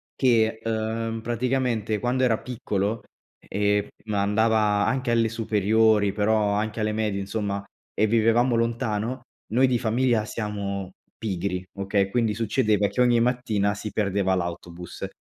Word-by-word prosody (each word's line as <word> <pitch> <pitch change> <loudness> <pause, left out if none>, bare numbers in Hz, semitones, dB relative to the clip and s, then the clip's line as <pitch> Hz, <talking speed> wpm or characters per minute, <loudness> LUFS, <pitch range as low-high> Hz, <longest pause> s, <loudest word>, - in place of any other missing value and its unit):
che, 115 -4 +2
uhm, 115 0 -2
praticamente 120 -2 -1
quando 125 +3 0
era 115 -3 +2
piccolo, 105 -3 -3 0.3
ehm, 105 0 0 0.2
andava 105 0 +2
anche 130 -2 0
alle 115 -1 +2
superiori, 110 -1 +2
però 105 0 +1
anche 110 +1 -2
alle 110 0 0
medie 105 -2 -1
insomma, 100 0 -3 0.3
e 110 - +2
vivevamo 115 +2 +3
lontano, 115 +1 -1 0.3
noi 130 +4 +4
di 125 - +2
famiglia 115 -1 +1
siamo 100 -4 -4 0.2
pigri, 95 -3 -3
okay, 100 0 0
quindi 115 0 +1
succedeva 110 -2 +1
che 125 - -6
ogni 120 -1 +4
mattina 115 -4 +1
si 100 +1 -6
perdeva 100 -2 0
l'autobus. 85 -1 -5
110 Hz, 130 wpm, -25 LUFS, 100-115 Hz, 0.3 s, noi